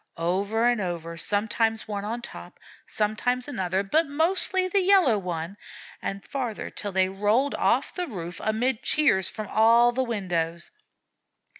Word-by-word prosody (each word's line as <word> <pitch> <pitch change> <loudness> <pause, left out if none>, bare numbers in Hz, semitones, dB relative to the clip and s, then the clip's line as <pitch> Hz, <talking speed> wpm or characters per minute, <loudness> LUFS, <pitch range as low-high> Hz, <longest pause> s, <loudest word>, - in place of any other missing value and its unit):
Over 200 +7 0
and 240 -3 +2
over, 170 -2 -4
sometimes 220 +5 0
one 205 -2 -4
on 230 +3 -4
top, - - -11 0.3
sometimes 240 +4 -1
another, 190 -7 -1
but 310 +11 +1
mostly 370 +5 +1
the 390 +2 +2
Yellow 360 - +4
One; 175 +1 -5 0.4
and 195 0 -5
farther 245 -6 -4
till 205 - -5
they 190 0 +2
rolled 210 +8 +1
off - - +1
the 360 -1 -3
roof, 175 -6 -7
amid 225 +2 0
cheers 220 -12 +3
from 215 -2 -6
all 230 +3 +5
the 255 +2 -1
windows. 175 -7 -3
215 Hz, 145 wpm, -26 LUFS, 190-250 Hz, 0.4 s, all